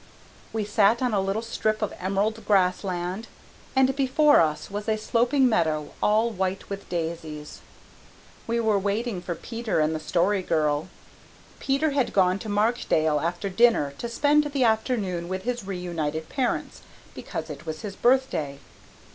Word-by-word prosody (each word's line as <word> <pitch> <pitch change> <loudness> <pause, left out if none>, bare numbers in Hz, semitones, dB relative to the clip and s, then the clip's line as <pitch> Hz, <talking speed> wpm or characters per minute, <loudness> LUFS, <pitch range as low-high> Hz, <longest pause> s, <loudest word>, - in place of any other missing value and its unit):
We 220 -2 -2
sat 210 +3 +3
on 250 -3 +1
a 200 - +2
little 195 +4 -1
strip 215 -1 -1
of 210 - -2
emerald 200 +4 -1
grassland 185 0 0 0.5
and 265 0 +4
before 290 +2 +4
us 155 +2 -1
was 205 +2 -4
a 215 - +2
sloping 245 +5 +2
meadow 155 -9 0
all 220 +2 +3
white 190 -1 -3
with 200 0 -6
daisies. 160 -3 -5 0.9
We 230 +1 0
were 220 -3 +2
waiting 205 0 -2
for 175 -1 -4
Peter 230 +1 -3
and 155 +1 +2
the 155 - -2
Story 180 +5 +1
Girl. 155 -2 0 0.7
Peter 280 +3 +1
had 275 -3 0
gone 185 0 +3
to 220 - -7
Markdale 205 -8 +1
after 175 +6 -2
dinner 195 -8 +3
to 235 - -4
spend 290 +5 +3
the 280 -3 0
afternoon 220 -7 0
with 190 0 -3
his 240 -3 -3
reunited 160 -4 -3
parents 260 -3 -2 0.3
because - - -6
it - - -10
was 155 0 -5
his 200 -2 -5
birthday. 240 - +1
200 Hz, 155 wpm, -25 LUFS, 175-235 Hz, 0.9 s, and